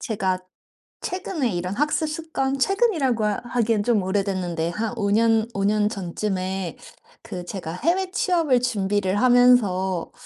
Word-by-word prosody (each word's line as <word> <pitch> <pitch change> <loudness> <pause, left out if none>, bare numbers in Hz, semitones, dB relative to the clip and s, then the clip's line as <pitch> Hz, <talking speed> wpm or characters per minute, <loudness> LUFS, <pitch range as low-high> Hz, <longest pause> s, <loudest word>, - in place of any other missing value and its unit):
제가 190 -4 -1 0.6
최근에 350 - -2
이런 180 +2 -3
학습 300 +2 +1
습관 305 -4 -2
최근이라고 305 - +1
하기엔 225 0 0
좀 225 -4 +2
오래됐는데 185 -4 -1
한 220 +5 -3
5 205 -3 0
년 225 0 +3
5 195 - -1
년 210 +1 +2
전쯤에 190 -2 -3 0.5
그 180 -1 -7
제가 175 -3 -6
해외 360 - 0
취업을 330 -10 +2
준비를 205 -5 0
하면서 225 -8 +3
215 Hz, 265 characters per minute, -23 LUFS, 190-255 Hz, 0.6 s, 년